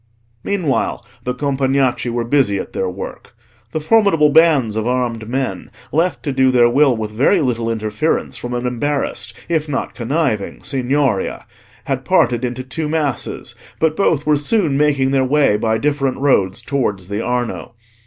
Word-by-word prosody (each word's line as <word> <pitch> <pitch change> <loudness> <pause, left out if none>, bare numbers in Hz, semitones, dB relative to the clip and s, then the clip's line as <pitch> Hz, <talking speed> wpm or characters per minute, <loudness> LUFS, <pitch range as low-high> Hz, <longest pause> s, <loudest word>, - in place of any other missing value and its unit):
Meanwhile 180 -9 -1 0.2
the 125 0 -2
Compagnacci 135 -2 0
were 120 0 -1
busy 120 -5 +2
at - - -6
their 95 - -1
work. 95 +5 -8 0.4
The 155 - -2
formidable 165 -4 +3
bands 145 -9 +4
of 110 +1 -1
armed 120 -3 -1
men, 125 -8 -3 0.2
left 165 +4 0
to 140 - -2
do 130 0 +3
their 125 -2 +5
will 135 0 +3
with 110 -1 -4
very 135 - +3
little 120 -5 -1
interference 110 +6 -1
from 120 0 -5
an 120 0 -3
embarrassed 135 +4 -2
if 160 -2 -1
not 135 - -3
conniving 125 -4 -2
Signoria, 135 -5 -1 0.4
had - - -2
parted 120 0 +2
into 125 +1 -3
two 150 +4 -4
masses, 150 -5 -2 0.2
but 160 -1 +1
both 160 -6 +1
were 150 -1 +3
soon 155 0 +1
making 140 -2 +2
their 135 -1 +2
way 140 -4 +3
by 110 +1 +1
different 140 +1 0
roads 100 -9 +1
towards 105 -10 -2
the 100 +2 -3
Arno. 120 -1 -3
130 Hz, 160 wpm, -18 LUFS, 120-150 Hz, 0.4 s, their